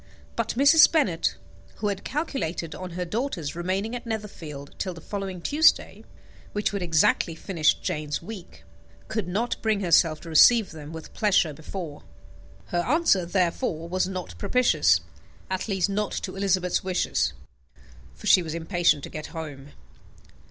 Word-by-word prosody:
But 230 -1 -2
Mrs. 285 +4 +7
Bennet, 195 - +1 0.4
who 210 - -1
had 200 -1 -4
calculated 185 - -3
on 180 +2 -7
her 180 - -2
daughters 180 - -3
remaining 190 +6 -2
at 240 -1 -7
Netherfield 165 -10 -6
till 185 -2 -3
the - - -9
following 190 0 -5
Tuesday, 310 +2 +3 0.5
which 205 0 -1
would 200 - -2
exactly 165 -1 +2
finish 160 -2 +1
Jane's 150 -1 -3
week, 190 0 -10 0.5
could 220 -4 -2
not 220 +7 -2
bring 215 -2 +1
herself 165 -3 +3
to 170 - -9
receive 215 +7 +6
them 155 -1 -9
with 160 -1 -9
pleasure 190 -7 +2
before. 160 0 -7 0.7
Her 175 - 0
answer, 245 - +2
therefore, 175 -1 -1
was 185 +1 0
not 185 - -6
propitious, 250 - +3 0.5
at 190 +2 -2
least 190 -3 +1
not 205 +1 -2
to - - -4
Elizabeth's 190 -2 +1
wishes, 185 -1 0 0.8
for - - -13
she 185 - +6
was 160 -2 -5
impatient 170 -3 +1
to - - -6
get 155 - -6
home. 145 -4 -7
185 Hz, 150 wpm, -26 LUFS, 165-210 Hz, 0.8 s, Mrs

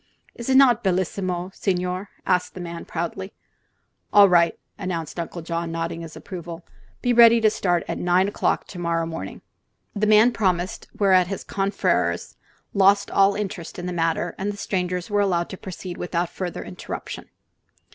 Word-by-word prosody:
"Is 235 +2 -6
not 260 -3 +5
bellissima, 185 -1 -1
signore?" 180 +1 -2 0.2
asked 180 -1 +1
the - - -7
man, 170 -1 -6
proudly. 175 +3 -4 0.8
"All 205 -1 +8
right," 170 -2 +4 0.2
announced 170 -2 -4
Uncle 170 0 -5
John, 170 0 -3
nodding 165 0 -3
approval. 170 +1 -8 0.4
"Be 245 -1 +3
ready 235 0 +8
to 220 -1 +4
start 175 -5 0
at - - -3
nine 180 +2 +3
o'clock 205 - 0
to 180 - -8
morrow 170 -1 0
morning." 165 0 -7 0.5
The 210 +1 +1
man 215 +3 +6
promised, 185 -2 -1
whereat 185 -3 +4
his 195 +1 -5
confreres 195 0 -1 0.4
lost 200 0 +4
all 195 0 +4
interest 195 -5 -5
in 175 - -5
the 180 - -3
matter 165 0 0
and 200 +2 -1
the 205 - -9
strangers 180 -1 -2
were 205 0 +3
allowed 175 -4 +1
to - - -6
proceed 180 -1 -7
without 175 -1 -2
further 180 -2 -5
interruption. 90 -2 -7
180 Hz, 155 wpm, -23 LUFS, 170-200 Hz, 0.8 s, All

